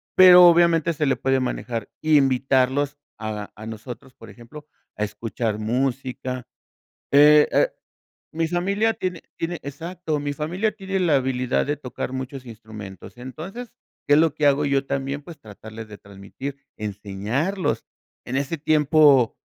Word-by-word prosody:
Pero, 180 -1 +9
obviamente, 170 -1 +4
se 150 -1 -1
le 135 - +2
puede 135 0 +1
manejar 120 -3 -4
invitarlos 135 -1 +2 0.2
a 105 -2 -5
a 110 - -10
nosotros, 120 +4 -9
por - - -14
ejemplo, 150 +6 -13 0.3
a 105 - -2
escuchar 110 +1 -3
música. 125 +2 -2 0.7
eh 150 +1 +7
eh, - - +3 0.7
mi 165 +1 0
familia 200 +6 0
tiene 180 -5 -4 0.2
tiene, 170 +1 -3
exacto, 160 +2 -4
mi 145 0 -3
familia 175 +9 -1
tiene 195 -2 -3
la 170 -5 +3
habilidad 130 -1 0
de 145 0 -1
tocar 130 -2 -6
muchos 130 0 -6
instrumentos. 110 -4 -11
Entonces, 170 - -8 0.4
¿qué 145 - +4
es - - +5
lo 160 -2 +3
que 150 - +2
hago 145 +1 +2
yo 140 -1 +1
también? 140 +1 -3
Pues, 165 +2 -12
tratarles 110 0 -11
de 105 - -11
transmitir, 100 +8 -9 0.2
enseñarlos. 110 - -3 0.4
En 125 - -4
ese 140 +4 -1
tiempo, 150 -4 +4
140 Hz, 145 wpm, -23 LUFS, 120-160 Hz, 0.7 s, Pero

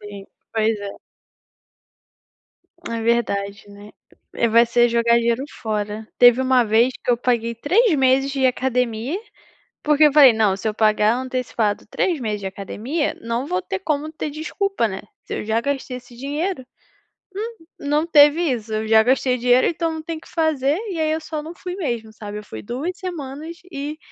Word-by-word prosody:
Sim, 200 -1 -9 0.3
pois 220 0 +1
é. 200 -1 -7 1.9
É 230 0 -2
verdade, 205 -4 -1
né? 205 +1 -13 0.6
Vai 230 +1 +6
ser 240 +1 +3
jogar 235 0 +3
dinheiro 235 +2 0 0.2
fora. 215 -1 -3
Teve 245 +1 +7
uma 260 -1 +3
vez 230 +4 +3
que - - 0
eu 240 - +3
paguei 235 -1 0
3 365 - +2
meses 270 0 +3
de 270 -1 +1
academia, 250 - -1 0.7
porque 300 0 +4
eu 295 - +4
falei: 280 -5 +8
"Não, 215 -3 +2
se 200 - -4
eu 215 - 0
pagar 215 0 +3
antecipado 250 -5 -2
3 340 +5 0
meses 215 -4 -2
de - - -6
academia, 220 - -3
não 235 +3 -2
vou 185 -9 -1
ter 190 +1 -4
como 300 +8 -2
ter 305 - -4
desculpa, 315 - -1
né? 190 -1 -6 0.2
Se - - -5
eu - - -4
já 220 +1 +1
gastei 270 -2 -3
esse 245 -1 -15
dinheiro". 290 +4 -3 1.0
Hum, 325 - -20 0.2
não 300 +2 +2
teve 295 0 +6
isso, 225 -2 -5
eu 215 0 -2
já 220 0 +6
gastei 255 +1 +2
dinheiro 245 +1 +4
então 330 -1 -1
não 315 - -6
tem 325 0 -5
que - - -17
fazer, 305 -3 +1
e 350 - -4
aí 310 0 +1
eu 315 - -1
só 310 -1 -5
não 325 +3 -8
fui 360 +1 -7
mesmo, 235 - -3
sabe? 210 -1 -7
Eu 210 - -9
fui 110 - -9
2 310 +9 -4
semanas 320 -3 -6 0.2
e 290 +2 -5
250 Hz, 180 wpm, -21 LUFS, 220-295 Hz, 1.9 s, falei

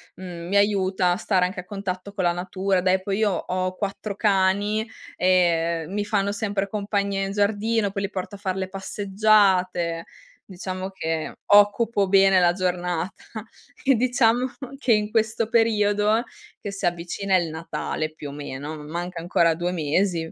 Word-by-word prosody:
mhmm, 175 -2 -8
mi 200 - +2
aiuta 190 -3 +2
a - - -1
stare 185 -3 +1
anche 180 0 -4
a - - -21
contatto 195 0 -5
con 190 -3 -2
la 175 - +3
natura; 185 +1 -1
dai, 185 0 +2
poi 195 +2 -2
io 210 -2 +3
ho 185 +1 -2
4 200 0 -4
cani, 205 +1 +2 0.3
e, 180 - 0 0.6
ehm, 185 - -9
mi 205 0 0
fanno 200 -1 0
sempre 200 -1 -2
compagnia 200 -1 -1
in 195 - -4
giardino, 205 +1 +1
poi 200 -1 -3
li 200 - -2
porto 195 +1 -5
a - - -9
far 190 -2 -3
le 190 0 -2
passeggiate; 190 -3 +1 0.4
diciamo 185 0 -5
che 160 -4 -3
occupo 205 0 +4
bene 195 -1 +5
la 175 -1 +4
giornata. 180 -1 -2 0.6
E 270 -2 +4
diciamo 245 0 +2 0.3
che 240 -5 +3
in 210 0 +1
questo 220 0 +1
periodo, 215 -1 +3 0.4
che 205 - -5
si 195 -1 -4
avvicina 175 +3 -1
il 175 -3 +1
Natale 155 -1 -4
più 145 -2 -8
o - - -7
meno, 145 +1 -6
manca 170 +2 -5
ancora 170 -1 +2
2 175 +1 -2
mesi; 165 +1 0
195 Hz, 165 wpm, -24 LUFS, 180-205 Hz, 0.6 s, bene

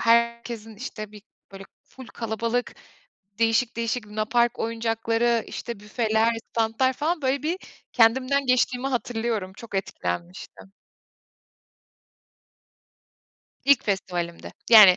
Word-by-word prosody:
herkesin, 235 -1 +1
işte, 215 -3 -7
bir, 210 -1 -12 0.3
böyle, 195 0 -9 0.2
ful 260 -2 -13
kalabalık 230 +2 -2 0.6
değişik 230 +1 +2
değişik 230 -1 -1
lunapark 220 +3 +1
oyuncakları, 225 0 0
işte, 235 -4 -6
büfeler, 220 +1 +1 0.2
stantlar 230 +3 +1
falan, 310 +3 -1
böyle, 265 +2 +1
bir 340 +4 -1 0.3
kendimden 260 +4 +3
geçtiğimi 250 +1 +2
hatırlıyorum. 225 -6 -2
Çok 230 -4 -11
etkilenmiştim. 185 0 -4 2.9
İlk 280 -3 +5
festivalimdi. 175 -4 -3 0.2
Yani 205 -5 +10
230 Hz, 95 wpm, -25 LUFS, 215-245 Hz, 2.9 s, Yani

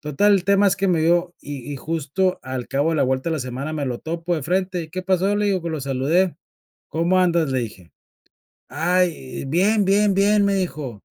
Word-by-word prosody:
total 150 +8 +2
el 190 -2 +2
tema 200 +1 +4
es 190 - +3
que 195 +1 0
me 170 -3 +2
dio 175 +2 +2
y 140 -1 -7
y - - -4
justo 165 +5 -1
al 130 -1 -5
cabo 140 +4 0
de 160 - 0
la - - +2
vuelta 130 +4 -1
de - - 0
la - - -4
semana 130 +4 -5
me 145 -2 -2
lo 120 -2 -3
topo 170 +2 -3
de 155 - -3
frente 185 +2 -1
y, - - -13
"¿Qué 185 +3 -5
pasó?", 190 +2 +1
le 210 0 +1
digo 190 -3 +1
pues 170 0 -4
lo 155 - -3
saludé: 145 +7 +1 0.6
"¿Cómo 170 +4 +1
andas?", 170 -4 +2
le 130 - 0
dije, 95 -7 -8 0.8
"Ay 175 -6 -1
bien 200 +8 +2
bien 200 +1 +3
bien" 205 +1 +3
me 200 0 +2
dijo. 150 - -4
170 Hz, 220 wpm, -22 LUFS, 140-190 Hz, 0.8 s, tema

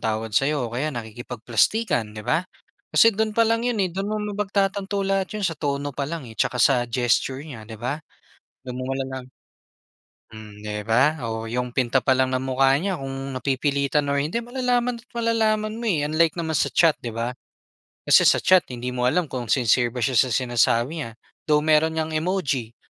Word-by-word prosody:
tawad 110 0 -2
sa 135 +6 +3
'yo 140 -6 -1
o - - -14
kaya 130 +6 -1
nakikipagplastikan, 120 - -1
'di 110 - -7
ba? 170 +4 0 0.5
Kasi 230 - +7
do'n 215 +1 -1
pa 230 - +4
lang 230 +2 +1
'yon 245 - 0
eh 185 - 0
do'n 195 +3 -3
mo 215 - -1 0.2
mapagtatanto 200 0 -1
lahat 195 -1 0
'yon 210 - -3
sa 165 -4 -1
tono 145 -1 -2
pa 140 0 -4
lang, 160 -3 -5
eh, 110 - -15
tsaka 125 -2 +1
sa 125 -3 +3
gesture 125 +3 0
niya 120 -9 -10
'di 110 - -8
ba? 125 +7 -3 0.7
Do'n 125 - -5
mo 130 - -4
malalam 130 -1 -5 1.0
Mm 105 -1 -11
'di 105 0 -5
ba? 135 +8 +3
Oh, 110 0 -3
'yong 125 0 -3
pinta 130 0 +2
pa 130 +1 +2
lang 130 0 +1
ng 130 - +1
mukha 130 +1 +2
niya 190 +4 -1
kung 135 0 -5
napipilitan 140 +2 0
or 140 0 +1
hindi 155 +10 -2
malalaman 245 0 0
at - - -29
malalaman 220 -2 0
mo, 230 - -7
eh, 150 -5 +1
unlike 160 +2 +1
naman 160 -1 -2
sa - - +1
chat 165 -3 +4
'di 120 - -4
ba? 115 +2 -3 0.7
Kasi - - +7
sa - - +5
chat 185 -2 +5
hindi 125 0 -4
mo 125 0 0
alam 180 +2 +1
kung 125 -3 -4
sincere 120 -1 +3
ba 125 - -4
siya 130 +2 +1
sa 130 - +3
sinasabi 120 +5 +1
niya. 115 - -6 0.4
Though, 150 0 +4
meron 155 +1 +3
ngang 160 0 -2
emoji, 155 -9 -1
140 Hz, 200 wpm, -23 LUFS, 125-185 Hz, 1.0 s, Kasi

